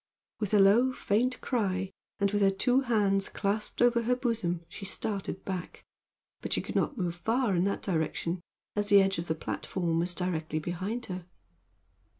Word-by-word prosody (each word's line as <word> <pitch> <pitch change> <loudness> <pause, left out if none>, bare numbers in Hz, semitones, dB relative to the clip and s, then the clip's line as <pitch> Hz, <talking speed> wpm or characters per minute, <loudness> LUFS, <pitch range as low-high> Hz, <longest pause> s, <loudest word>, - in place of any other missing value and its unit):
With 210 -1 0
a - - +6
low, 220 +7 +6
faint 250 +1 0
cry, 195 -6 -1 0.3
and 200 -1 +2
with 205 0 +1
her 195 - +6
two 245 +7 +2
hands 205 -6 +2
clasped 210 +3 -1
over 240 -1 +4
her 245 +2 +2
bosom, 220 -9 -1
she 195 - -9
started 195 -1 -3
back, 185 -3 -5 0.6
but - - -2
she - - +1
could - - -6
not 285 - +1
move 175 -4 -1
far 225 +2 +1
in 175 +2 +2
that 200 - -1
direction, 170 0 -1 0.3
as 205 0 0
the 200 0 +8
edge 195 -2 +2
of 170 - -4
the 160 - 0
platform 165 +1 -2
was 175 +1 0
directly 160 -4 -2
behind 185 +9 -3
her. 180 -2 -6
195 Hz, 175 wpm, -30 LUFS, 180-225 Hz, 0.6 s, the